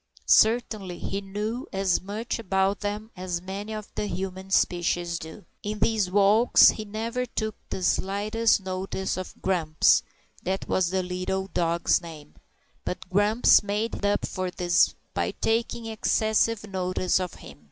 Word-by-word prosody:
Certainly 215 -5 +3
he 195 +3 -4
knew 210 +6 -4
as 190 -2 +1
much 210 +6 -4
about 195 -1 +1
them 210 +2 -4
as 180 -1 -3
many 195 +4 -6
of 215 -1 -6
the 210 - -2
human 190 +1 -5
species 175 -2 +1
do. 160 +1 -10 0.2
In 210 +1 -4
these 215 -4 +1
walks 205 +5 +6
he 215 - -3
never 230 +4 -3
took 220 -2 -3 0.2
the 185 - -4
slightest 210 +4 +1
notice 190 0 -3
of 185 0 -7
Grumps 165 -5 +3 0.4
(that 190 +1 -3
was 185 -2 +1
the 185 0 0
little 185 +1 -2
dog's 170 0 +2
name), 155 -4 -11 0.5
but 180 - -5
Grumps 205 +4 +5
made 210 +2 -3
up 205 0 +1
for 185 -1 -3
this 175 -1 +2 0.2
by - - -1
taking 230 +1 0
excessive 220 0 +1
notice 185 -1 0
of 180 -2 -4
him. - - -13
195 Hz, 145 wpm, -26 LUFS, 185-215 Hz, 0.5 s, walks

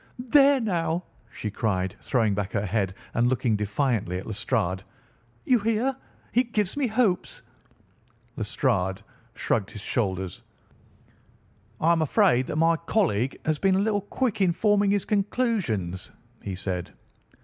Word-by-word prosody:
"There, 275 +3 +5
now!" 175 -6 -1 0.3
she 105 - -5
cried, 95 -4 -1
throwing 115 -6 +1
back 100 0 -3
her 105 -1 0
head 95 -1 -1 0.2
and 120 +1 +2
looking 125 -3 +1
defiantly 105 -2 0
at 95 - -6
Lestrade. 100 -3 -1 0.6
"You 250 -2 +4
hear! 230 +5 0 0.4
He 245 - +3
gives 210 -6 -1
me 285 -3 +1
hopes." 220 -5 0 0.9
Lestrade 95 0 -1 0.3
shrugged 100 -4 0
his 105 - -9
shoulders. 95 -5 -2 1.4
"I 165 - +3
am 165 -1 +3
afraid 130 -4 +3
that - - -3
my 165 +1 +3
colleague 160 - 0
has 155 -1 0
been 195 -1 +3
a 195 +2 +2
little 210 -2 +1
quick 220 +1 -2
in 180 -3 +4
forming 205 +1 +3
his 200 -1 +1
conclusions," 195 - -1 0.3
he 95 - -4
said. 90 -1 -4
150 Hz, 140 wpm, -26 LUFS, -, 1.4 s, There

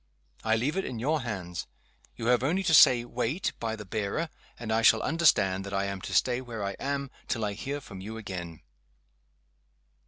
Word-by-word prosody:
I 110 0 +3
leave 135 +10 0
it 195 - +1
in 120 - -5
your 150 +7 0
hands. 90 -7 -5 0.5
You 115 - -6
have 125 0 +4
only 170 +9 +1
to 175 -3 +2
say, 125 -5 +7
Wait, 125 +9 -2
by 110 -1 -2
the 105 -1 -9
bearer 110 - -2 0.3
and 110 -2 -3
I 110 - +3
shall 110 -1 +5
understand 95 - +3
that 100 0 -5
I 100 - +1
am 100 -1 -4
to - - -6
stay 125 0 +2
where 115 -4 -6
I 100 - -1
am 140 -1 -2 0.2
till 115 -5 -1
I 100 - -2
hear 140 +7 -4
from 95 -8 -10
you 110 +3 -6
again." 90 -6 -6
115 Hz, 195 wpm, -28 LUFS, 100-135 Hz, 0.5 s, say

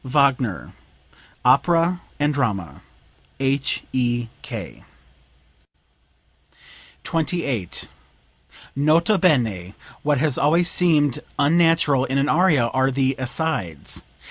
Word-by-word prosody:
Wagner, 130 - 0 0.7
"Opera 175 +1 +3 0.2
and 145 +1 +1
Drama." 100 - -2 0.6
H.E.K.]) 130 -3 -3 2.2
28. 150 - -2 0.9
"Nota 160 +8 +3
bene, 110 - +1 0.3
what 145 -1 +1
has 145 0 +1
always 170 +4 +3
seemed 150 -6 +2 0.2
unnatural 155 -3 +3
in 135 +1 -2
an 140 +2 +1
aria 160 -7 +3
are 130 +1 +1
the 135 0 0
asides. 130 - -3
140 Hz, 80 wpm, -22 LUFS, 125-160 Hz, 2.2 s, Opera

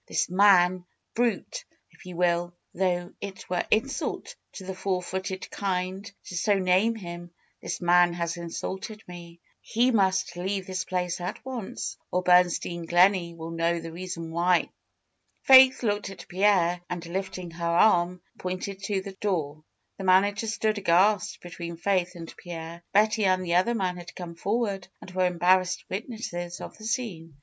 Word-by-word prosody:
This - - -1
man 185 -2 +5
— - - -52
brute! 245 - -1 0.3
if - - -16
you 180 - -7
will, 175 0 +1 0.2
though 175 -1 -1
it 195 -2 -7
were 180 - +1
insult 275 +6 -1 0.2
to 190 - -9
the 190 - -4
four 185 -1 -2
footed 190 +1 -4
kind 190 +1 -3
to 185 - -8
so 200 +4 +2
name 190 +5 +3
him 175 -4 -8 0.2
— - - -42
this - - -4
man 175 0 +5
has 170 0 -2
insulted 190 +5 -6
me. 170 -1 -11 0.2
He 245 +3 +2
must 190 -4 +1
leave 190 +2 -2
this 185 0 -3
place 180 -1 -2
at 180 +7 -5
once, 250 -6 -5
or 180 0 0
Bernstein 175 -1 +3
Gleney 175 -1 +4
will 165 0 -7
know 165 +1 0
the 165 0 -7
reason 170 -1 -6
why." 175 +1 +2 0.7
Faith 260 -1 +8
looked 205 -3 0
at 195 - -11
Pierre 180 -2 +2
and 175 -1 -4
lifting 185 0 -4
her 170 0 -4
arm, 175 0 +3 0.2
pointed 185 +2 -4
to 195 -1 -1
the 195 0 -8
door. 160 -7 -2 0.4
The - - -4
manager 200 +4 +3
stood 215 -1 0
aghast 190 +2 +2
between 170 -1 -7
Faith 180 0 0
and 165 -1 -9
Pierre. 170 -1 -8
Betty 215 +1 +3
and 185 -1 +2
the 170 - -1
other 190 +7 +3
man 185 -4 -1
had 175 -1 -10
come 175 -2 -7
forward, 200 +1 -2
and 185 - -11
were 185 0 +2
embarrassed 185 +1 +2
witnesses 190 -5 -5
of - - -8
the 215 - -10
scene. 175 - -3
185 Hz, 165 wpm, -27 LUFS, 175-200 Hz, 0.7 s, Faith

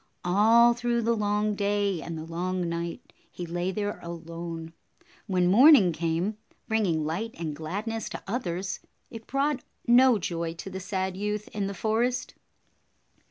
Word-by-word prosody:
All 225 +6 +6
through 240 0 0
the 230 +1 +2
long 210 0 +1
day 200 -3 0
and 165 +1 -6
the 155 - -5
long 180 +2 -2
night, 170 0 -5 0.2
he 175 - -6
lay 175 +2 -2
there 205 +2 -3
alone. 165 -1 -7 0.5
When 185 -3 +2
morning 225 - +7
came, 170 +6 -1 0.3
bring 220 -2 +1
ing 160 -3 0
light 205 +9 -3
and 160 -3 -4
gladness 215 +8 -4
to - - -7
others, 190 -4 -3 0.3
it 225 -1 -9
brought 275 0 0 0.2
no 245 0 +6
joy 170 -3 -3
to 190 +3 -8
the 190 - -5
sad 190 -1 -2
youth 210 +1 -3
in 205 -2 -2
the 200 - -5
forest. 225 +5 0
195 Hz, 155 wpm, -27 LUFS, 170-220 Hz, 0.5 s, morning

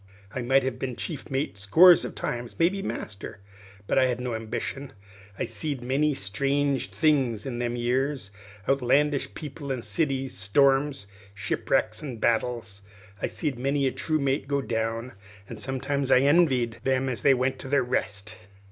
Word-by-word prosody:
I 130 - -3
might 135 +2 +3
have 130 -1 -3
been 130 -2 -3
chief 155 +3 -5
mate 135 -7 -2
scores 165 - +7
of - - -6
times, 120 -1 -4
maybe 185 +4 +2
master; 105 - -6 0.5
but 135 - +2
I 130 - +4
hadn't 125 0 -2
no 125 -2 -2
ambition. 115 +5 -4 0.4
I - - -1
seed 145 -5 -4
many 140 +4 +1
strange 140 +6 0
things 135 -9 +1
in 120 -3 -4
them 120 0 -1
years 125 -1 -1 0.4
outlandish 140 +2 +2
people 145 -2 -6
an' 125 -3 -3
cities, 135 -5 -1
storms, 135 +5 +2 0.3
shipwracks, 105 +2 0
an' 130 -6 -6
battles. 115 -3 -1 0.4
I - - +1
seed 145 -7 -3
many 140 +2 +1
a 130 - +2
true 155 +5 -1
mate 140 -1 0
go 140 0 +1
down, 115 -1 -2 0.3
an' - - -8
sometimes 135 +1 -2
I 130 - +6
envied 135 -6 +3
them 130 0 +1
what 125 -3 -3
went 130 +1 -1
to - - -7
their 140 0 +2
rest. 105 -3 -3
130 Hz, 160 wpm, -26 LUFS, 120-140 Hz, 0.5 s, scores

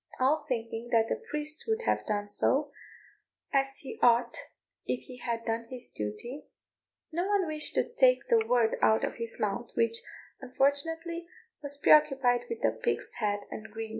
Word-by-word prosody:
All 275 +5 +2
thinking 230 -1 -3
that 225 -1 +3
the 460 - -2
priest 300 +1 -4
would 450 +1 0
have - - 0
done 205 -1 -1
so, 275 +8 +2 0.8
as 270 0 +1
he 265 - -8
ought 240 0 +4 0.5
if 250 - -1
he 255 - -11
had 230 -2 -3
done 230 0 -1
his 255 -1 -6
duty, 105 - -6 0.6
no 345 +4 -1
one 405 -2 +2
wished 305 -2 -2
to - - +2
take - - +3
the 455 -2 +4
word 240 - +2
out 220 - +4
of - - -2
his 230 -1 -5
mouth, 210 +3 -2
which, 230 0 +3 0.4
unfortunately, 325 +6 0 0.3
was 285 -1 -3
preoccupied 270 -5 +4
with 110 - -1
pig's 120 +1 -1
head 205 -2 0
and 220 +1 -7
greens. 220 +1 -6
250 Hz, 165 wpm, -30 LUFS, 225-305 Hz, 0.8 s, ought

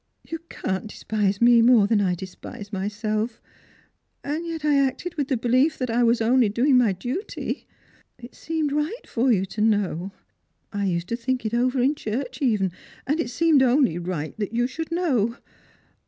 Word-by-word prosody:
" - - -50
You 325 - -3
can't 190 +3 -3
despise 205 -2 -1
me 235 0 +6
more 235 -3 +6
than 205 0 +2
1 180 -2 +1
despise 190 +3 -9
myself, 215 +3 -2 0.8
and 310 +4 -3
yet 325 -2 -4
I 295 -1 +3
acted 275 +6 -1
with 290 -4 -2
the 265 -3 0
belief 255 +6 +2
that 250 -3 -2
I 235 +2 +2
was 235 0 +3
only 235 0 +4
doing 255 +6 +3
my 245 -4 +4
duty. 250 - -4 0.5
It 240 +1 -12
seemed 320 -3 -2
right 300 - -2
for 250 +2 +1
you 195 -4 +2
to 210 +3 -5
know. 200 -4 +1 0.6
I 205 0 -1
used 175 -2 -1
to 235 - 0
think 255 +1 -2
it 220 - -2
over 250 +2 +1
in 265 +4 +3
church 245 0 -4
even, 210 -8 +1 0.3
and 295 +5 0
it 245 - -1
seemed 310 +2 +3
only 255 - +3
right 170 -4 -4 0.2
you 240 +1 +1
should 320 +6 -5
know. 260 - +1
240 Hz, 180 wpm, -24 LUFS, 210-275 Hz, 0.8 s, me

